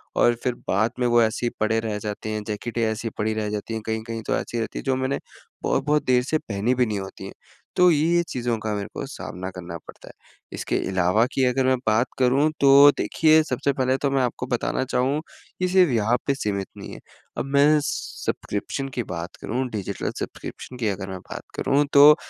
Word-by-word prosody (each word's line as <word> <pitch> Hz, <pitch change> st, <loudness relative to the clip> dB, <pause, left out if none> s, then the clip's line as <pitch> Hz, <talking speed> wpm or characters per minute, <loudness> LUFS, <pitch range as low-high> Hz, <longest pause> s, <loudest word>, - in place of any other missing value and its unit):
और 120 Hz, -, +4 dB
फिर 125 Hz, -2 st, +1 dB
बाद 110 Hz, +4 st, +2 dB
में 125 Hz, -, +1 dB
वो 120 Hz, 0 st, +5 dB
ऐसी 110 Hz, +2 st, +1 dB
ही 120 Hz, -, +2 dB
पड़े 110 Hz, +1 st, +2 dB
रह 110 Hz, -2 st, -3 dB
जाते 105 Hz, +1 st, -5 dB
हैं, 110 Hz, -1 st, -3 dB
जैकेटें 115 Hz, +3 st, -4 dB
ऐसी 110 Hz, +1 st, -1 dB
पड़ी 110 Hz, +1 st, 0 dB
रह 110 Hz, -1 st, -2 dB
जाती 105 Hz, +2 st, -4 dB
हैं, 110 Hz, -, -3 dB
कहीं-कहीं 110 Hz, 0 st, -3 dB
तो -, -, +2 dB
ऐसी 120 Hz, -, -3 dB
रहती 110 Hz, -, -3 dB
है -, -, -7 dB
जो 135 Hz, -1 st, +1 dB
मैंने 130 Hz, +1 st, -1 dB, 0.4 s
बहुत-बहुत 150 Hz, +2 st, +1 dB
देर 125 Hz, -1 st, +3 dB
से 155 Hz, +4 st, 0 dB
पहनी 110 Hz, -1 st, -1 dB
भी 125 Hz, 0 st, +3 dB
नहीं 105 Hz, -3 st, -2 dB
होती 95 Hz, 0 st, -8 dB
है। -, -, -7 dB, 0.4 s
तो 180 Hz, 0 st, +6 dB
ये-ये 165 Hz, +3 st, +3 dB
चीज़ों 120 Hz, -2 st, -1 dB
का 110 Hz, 0 st, -2 dB
मेरे 100 Hz, -1 st, -3 dB
को -, -, -4 dB
सामना 95 Hz, +1 st, -6 dB
करना 85 Hz, -2 st, -6 dB
पड़ता -, -, -14 dB
है। -, -, -11 dB, 0.4 s
इसके -, -, -2 dB
अलावा 95 Hz, +4 st, +3 dB
कि 135 Hz, -, +1 dB
अगर 130 Hz, +1 st, +2 dB
मैं 130 Hz, 0 st, +3 dB
बात 110 Hz, +4 st, +3 dB
करूँ, 135 Hz, +4 st, +4 dB
तो 140 Hz, +1 st, +8 dB
देखिए 160 Hz, 0 st, +4 dB
सबसे 140 Hz, 0 st, -1 dB
पहले 130 Hz, 0 st, +1 dB
तो 140 Hz, 0 st, 0 dB
मैं 135 Hz, -1 st, +2 dB
आपको 125 Hz, 0 st, -2 dB
बताना 130 Hz, +2 st, -1 dB
चाहूँ 130 Hz, +4 st, 0 dB, 0.4 s
कि 185 Hz, -, +1 dB
सिर्फ 180 Hz, -4 st, +4 dB
यहाँ 115 Hz, +1 st, +2 dB
पे 140 Hz, -, +2 dB
सीमित 100 Hz, -6 st, -2 dB
नहीं -, -, -8 dB
है। -, -, -9 dB, 0.4 s
अब -, -, -1 dB
मैं 150 Hz, +2 st, +6 dB
सब्सक्रिप्शन 135 Hz, +1 st, -3 dB
की 120 Hz, -, +1 dB
बात 85 Hz, +1 st, -6 dB
करूँ 130 Hz, +3 st, -2 dB
डिजिटल 105 Hz, -5 st, -4 dB
सब्सक्रिप्शन 125 Hz, -, -7 dB
की 115 Hz, -3 st, -1 dB
अगर 95 Hz, -1 st, -4 dB
मैं 95 Hz, -, -5 dB
बात -, -, -6 dB
करूँ, 145 Hz, +2 st, +2 dB
तो 145 Hz, +1 st, +9 dB
120 Hz, 215 wpm, -24 LUFS, 110-135 Hz, 0.4 s, तो